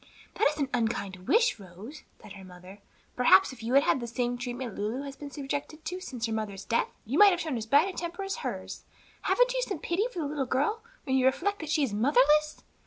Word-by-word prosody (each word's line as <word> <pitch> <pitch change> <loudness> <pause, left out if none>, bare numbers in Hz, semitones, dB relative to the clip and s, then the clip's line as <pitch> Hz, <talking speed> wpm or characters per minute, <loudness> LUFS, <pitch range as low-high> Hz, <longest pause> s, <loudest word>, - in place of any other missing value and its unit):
"That - - +3
is 300 +1 -2
an 285 -3 0
unkind 200 -6 -2
wish, 455 - +3
Rose," 200 - -11 0.2
said 205 - -12
her 195 -1 -11
mother. 185 +2 -13 0.4
"Perhaps 260 +6 +5
if 235 - -13
you 235 +4 -1
had 280 - +6
had - - +2
the 240 - -5
same 240 +1 -1
treatment 245 -1 -5
Lulu 220 +8 -3
has 275 -1 -7
been 290 +1 -8
subjected 285 +2 -5
to 365 +1 -4
since 250 -10 -4
her 225 - -3
mother's 205 -3 -4
death, 230 - +1 0.2
you 260 +8 -1
might 415 - +10
have 355 -3 0
shown 315 -6 -2
as 225 -2 -4
bad 285 +9 +5
a 380 - -6
temper 345 +3 -4
as 390 +4 -3
hers. 475 - -6 0.4
Haven't - - +2
you - - 0
some 410 -7 -3
pity 355 +9 -1
for - - -12
the 320 - -1
little 285 -3 -2
girl, 295 - 0 0.2
when 265 -1 +1
you 260 0 +4
reflect 405 +10 0
that 315 - -6
she 305 -1 +2
is 245 -7 -1
motherless?" 290 +6 +3
270 Hz, 240 wpm, -28 LUFS, 225-320 Hz, 0.4 s, might